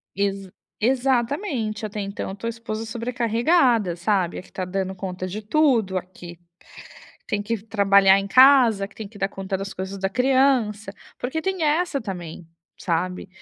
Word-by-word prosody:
Exa 195 -1 -2 0.3
exatamente. 250 - 0
Até 210 0 -5
então, 200 0 -4
eu 190 - -6
tô 230 - -6
a - - 0
esposa 225 -1 -5
sobrecarregada, 235 - +1
sabe, 175 -1 0
a - - -7
que - - -20
tá 185 - -4
dando 190 +1 -3
conta 185 -1 -5
de 205 +4 -5
tudo, 225 -6 +2
a 185 - -1
que 175 -2 -12 0.9
tem 205 -1 -1
que 230 +2 -2
trabalhar 200 -2 +4
em 195 - -4
casa, 245 -4 +6
que 205 - -23
tem 220 - -7
que 205 0 -15
dar 195 - 0
conta 195 0 -4
das 195 +1 -6
coisas 190 +1 -5
da 195 0 -1
criança. 250 -4 +1 0.2
Porque 265 +6 -3
tem 380 -1 -2
essa 310 -1 +1
também, 175 -6 -7 0.3
sabe, 180 +2 -2
210 Hz, 170 wpm, -23 LUFS, 195-245 Hz, 0.9 s, casa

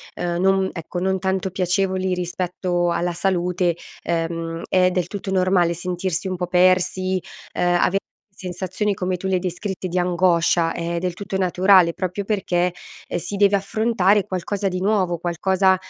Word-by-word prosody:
ehm, 175 0 -2
non 190 0 +3
ecco, 170 +1 -5
non 190 +1 0
tanto 190 0 -1
piacevoli 185 0 0
rispetto 180 0 -1
alla 175 0 -1
salute, 180 -1 0 0.3
ehm, 165 0 -2
è 185 -1 +4
del 180 -1 -1
tutto 200 -1 -6
normale 185 -2 +2
sentirsi 180 +1 -2
un 185 - -2
po' 180 -1 -2
persi. 185 +1 +2 0.3
Ehm, 175 0 +2
ave 195 - +2 0.4
sensazioni 185 +3 -2
come 185 -1 -2
tu 190 - -9
le 190 - 0
hai - - +2
descritte 185 +1 -4
di 180 +1 -3
angoscia, 175 -2 +2
è 170 0 -3
del 180 -1 -2
tutto 190 -1 -4
naturale, 185 -1 +4
proprio 185 +2 -3
perché, 180 -4 0 0.4
ehm, - - -2
si 200 - -5
deve 200 0 +4
affrontare 200 -1 +2
qualcosa 195 +2 -2
di 185 -1 -2
nuovo, 190 -3 +1
qualcosa, 190 +3 +2
185 Hz, 160 wpm, -22 LUFS, 175-190 Hz, 0.4 s, è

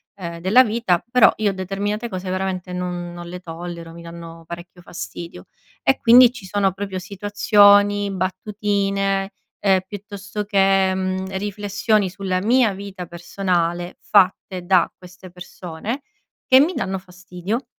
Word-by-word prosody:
ehm, 170 -3 -7
della 210 +9 +5
vita, 215 -6 0
però 250 -2 +6
io 210 -2 +1
determinate 200 +4 -3
cose 185 -1 -5
veramente 185 -1 -3
non 180 -1 -4
non 175 0 -8
le 180 +1 -7
tollero, 170 -1 -8
mi 170 - -11
danno 170 0 -10
parecchio 175 +1 -10
fastidio. 95 - -8 0.4
E 135 - +3
quindi 240 +1 +7
ci 245 -6 -11
sono 195 0 +1
proprio 195 -1 -5
situazioni, 205 +1 +4
battutine, 195 +1 -1 0.3
ehm, 190 -2 +3
piuttosto 205 0 -6
che, 195 -2 +3
mhmm, 190 0 -2
riflessioni 205 0 0
sulla 185 -1 -2
mia 230 -1 +3
vita 195 -2 -7
personale 175 0 -2
fatte 190 -2 +2
da 185 -2 +3
queste 180 0 -13
persone 180 - -7 0.5
che 260 0 +7
mi 325 +6 +3
danno 190 -8 -2
fastidio. 185 +5 -6
190 Hz, 135 wpm, -21 LUFS, 180-205 Hz, 0.5 s, quindi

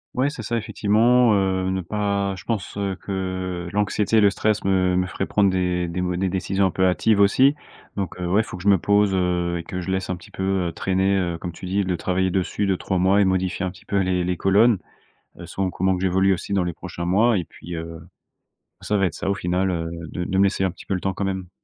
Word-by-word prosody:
Ouais, 130 +3 +2
c'est 140 -6 -7
ça, 120 +3 -2
effectivement, 115 +2 +3
heu, 95 -1 0
ne 95 - -1
pas 100 +1 -1
je - - -12
pense, 105 -4 -3
heu, 100 -1 -2
que 95 -2 -4
l'anxiété 105 +1 0
et 110 - +6
le 100 - +6
stress 105 +1 0
me 95 -1 +2
me 90 0 +1
feraient 95 +2 -3
prendre 100 -1 +2
des 90 -1 0
des 85 +2 -4
mau 90 -1 -1
des 95 +1 0
décisions 95 +1 0
un 95 - -3
peu 95 - +1
hâtives 100 +3 +2
aussi, 130 +8 +5 0.4
donc, 95 -3 -3
heu, - - -2
ouais, 90 +4 +2
il - - +3
faut - - -8
que 90 - -9
je 100 - +3
me 100 - +6
pose, 100 +2 +2
heu, 90 -2 0
et - - -6
que 90 - -5
je 95 - -4
laisse 95 -1 -2
un 90 - -1
petit 90 0 -15
peu, 95 -1 -1
heu, - - -6
traîner, 95 +3 +1
heu, 85 -3 -1
comme 85 +1 -6
tu 85 - -10
dis, 95 +2 0
de 90 -1 -1
travailler 95 +1 0
dessus 95 +2 -1
2-3 95 0 -1
mois 95 +3 +3
et 100 - +4
modifier 95 0 0
un 90 - -3
petit 95 - -17
peu 100 - -2
les 90 -1 +1
les 90 -1 -1
colonnes, 100 +3 +4 0.6
heu, - - -8
selon 95 -1 -2
comment 95 +1 0
que 90 - -5
j'évolue 95 +1 +3
aussi 90 - -5
dans 95 -2 +2
les 90 -1 -3
prochains 85 0 -7
mois 105 +5 +3
et 90 - -1
puis, 85 +1 -10
heu. 80 0 -6 0.8
Ça 105 - 0
va 95 - +2
être 85 - -3
ça, 95 - -4
au 100 - +2
final, 90 0 0
heu, 80 -1 -2 0.2
de 90 - -3
de 95 +2 -1
me 100 - +5
laisser 95 -1 0
un 95 - +2
petit 90 - -14
peu 100 - -1
le 90 - -2
temps, 95 0 -2
quand 100 - -3
même. 95 -2 -3
95 Hz, 265 wpm, -23 LUFS, 90-100 Hz, 0.8 s, et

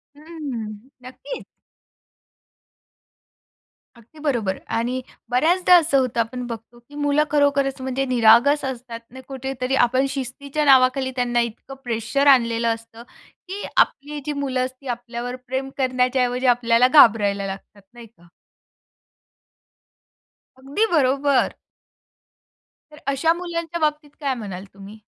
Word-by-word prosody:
हम्म, 265 -8 -7 0.2
नक्कीच! 260 - -8 2.5
अगदी 235 +7 -19
बरोबर 240 -11 -1 0.2
आणि 250 +3 -2 0.3
बऱ्याचदा 350 +8 +4
असं 320 -5 +4
होतं 250 -2 -1
आपण 245 +2 -2
बघतो, 230 +1 -9
की 285 +5 -18
मुलं 290 +1 +2
खरोखरच 280 -2 +1
म्हणजे 265 +1 -2
निरागस 245 +4 +4
असतात 245 -3 -6
आणि 260 +1 -11
कुठेतरी 265 -1 -3
आपण 255 +3 +1
शिस्तीच्या 280 +3 -3
नावाखाली 260 0 +4
त्यांना 240 -1 0
इतकं 235 +3 -6
प्रेशर 235 +4 -1
आणलेलं 235 -3 +4
असतं, 230 0 -14 0.4
की 390 +3 -6
आपली 295 +2 +1
जी 300 - -2
मुलं 265 -3 -1
असतील 260 +1 -10
आपल्यावर 240 +1 -5
प्रेम 265 +1 -3
करण्याच्या 255 0 +1
ऐवजी 250 +1 -1
आपल्याला 240 0 +4
घाबरायला 210 -8 +5
लागतात, 195 +1 -9
नाही 235 -1 -12
का? 175 -6 -24 2.3
अगदी 280 +12 0
बरोबर. 280 -2 +2 1.4
तर 300 - -14
अशा 280 +4 +2
मुलांच्या 340 -1 -5
बाबतीत 300 -1 -1
काय 280 -3 -1
म्हणाल 200 -5 -7
तुम्ही? 200 +2 -12
255 Hz, 115 wpm, -22 LUFS, 235-285 Hz, 2.5 s, घाबरायला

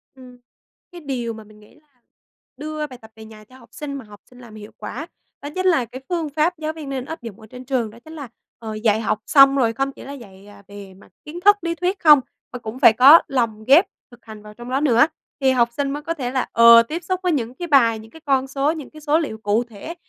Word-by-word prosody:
Ừm. 250 -1 -15 0.5
Cái 350 -1 -11
điều 245 -5 -4
mà 220 0 -11
mình 210 0 -19
nghĩ 210 - -21
là 305 0 -28 0.7
đưa 305 +1 -5
bài 255 -2 -12
tập 220 0 -16
về 220 0 -12
nhà 215 -1 -14
cho 255 +5 -19
học 235 -3 -19
sinh 290 -2 -7
mà 270 -5 -8
học 205 -1 -16
sinh 250 0 -19
làm 230 -3 -14
hiệu 210 0 -11
quả, 310 +6 -7 0.3
đó 285 - -6
chính 370 0 -2
là 320 -10 +3
cái 260 +4 -11
phương 330 -4 -2
pháp 315 +4 0
giáo 310 0 -4
viên 305 -4 -9
nên 265 -2 -4
áp 320 -2 -8
dụng 225 -4 -10
ở 220 - -15
trên 250 +3 -12
trường, 245 -5 -1
đó 230 +2 -16
chính 315 - -12
là, 285 -5 -8 0.3
ờ, 220 -2 -7
dạy 215 0 +1
học 215 -1 -1
xong, 275 -1 +6
rồi 230 -4 +1
không 270 +3 -2
chỉ - - -13
là 280 - -8
dạy, 200 -6 -14
à, 205 -1 -16
về 200 -2 -12
mặt 190 - -20
kiến 325 +4 -8
thức, 410 0 +8
lý 335 0 -3
thuyết 365 +3 -2
không, 300 -3 +7 0.3
mà 250 - -6
cũng 230 +3 -8
phải 220 - +7
có 280 +8 +8
lồng 230 -5 -2
ghép 320 +8 +6 0.3
thực 240 0 -19
hành 215 -1 -11
vào 210 0 -13
trong 240 +2 -11
đó 270 +2 -1
nữa. 245 -1 +4 0.3
Thì 265 -1 +3
học 240 -2 +2
sinh 280 -1 -1
mới 295 +1 -5
có 330 - -3
thể 255 -6 -5
là, 260 -1 -1
ờ, 230 0 +7
tiếp 325 +8 -6
xúc 370 +1 -2
với 360 - +1
những 250 -4 -3
cái 350 +3 -6
bài, 230 -7 +3
những 220 +1 -14
cái 320 - -15
con 270 -1 +1
số, 275 +3 0
những 310 -5 -8
cái 310 0 -14
số 305 +2 +1
liệu 255 -9 -4
cụ 220 +2 0
thể, 235 +8 -10
260 Hz, 270 wpm, -21 LUFS, 225-300 Hz, 0.7 s, thức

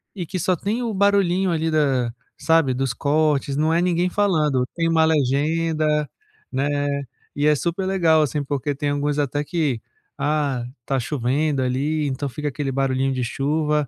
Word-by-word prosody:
e 180 -4 -4
que 185 +3 -4
só 180 +2 +1
tem 215 +8 -2
o 225 -2 -2
barulhinho 195 -2 +2
ali 160 -1 0
da 135 -6 +1 0.2
sabe, 160 -5 +3
dos 130 -2 -1
cortes, 145 0 +1
não 155 +2 +2
é 170 - +3
ninguém 180 0 +1
falando, 155 -11 +1
tem 165 -1 0
uma 165 -1 +4
legenda, 155 +1 +1 0.4
né, 135 +1 0 0.7
e 145 +1 0
é 150 - +5
super 170 +5 -2
legal, 170 -5 +3
assim, 150 0 0
porque 145 +1 -2
tem 145 +1 -2
alguns 145 +1 -1
até 145 +1 0
que: 150 -6 -1 0.4
"Ah, 145 -5 0 0.2
tá 135 -1 0
chovendo 140 +2 0
ali", 145 +4 0
então 140 +1 -3
fica 150 +4 -5
aquele 140 -1 -2
barulhinho 135 0 0
de 130 -1 -2
chuva. 150 +2 0
150 Hz, 170 wpm, -22 LUFS, 135-165 Hz, 0.7 s, é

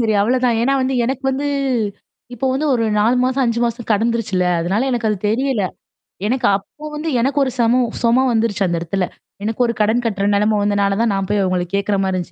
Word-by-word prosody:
சரி 220 -2 +1
அவ்ளதான். 245 +1 +2
ஏன்னா 270 +3 +2
வந்து 265 +1 0
எனக்கு 265 +2 -2
வந்து 280 +2 -2 0.9
இப்போ 255 +3 -2
வந்து 280 +4 -1
ஒரு 230 -2 +1
4 230 +4 +3
மாசம், 260 +1 +1
5 235 -1 0
மாசம் 235 0 -3
கடந்துருச்சுல. 220 -3 0 0.2
அதனால 195 +10 0
எனக்கு 240 -3 0
அது 210 - 0
தெரியல. 255 -1 0 0.7
எனக்கு 255 +2 +1
அப்போ 250 +9 -8
வந்து 315 +2 -3
எனக்கு 270 +4 0
ஒரு 260 - -1
சமோ 235 +2 +3 0.2
சொம 240 +3 +4
வந்துருச்சு 220 -3 0
அந்த 170 -1 -1
இடத்துல. 180 +3 -1 0.4
எனக்கு 225 +3 -2
ஒரு 235 - 0
கடன் 220 +3 +2
கட்டுற 200 -3 -1
நெலைம 210 +1 +2
வந்ததுனால 200 -1 +1
தான் 230 -2 +2
நான் 195 -1 -1
போய் 205 -1 +1
அவுங்கள 185 -1 0
கேட்கிறமாரி 200 -1 0
இருந்துச்சு 180 -2 -4
230 Hz, 195 wpm, -19 LUFS, 200-255 Hz, 0.9 s, சொம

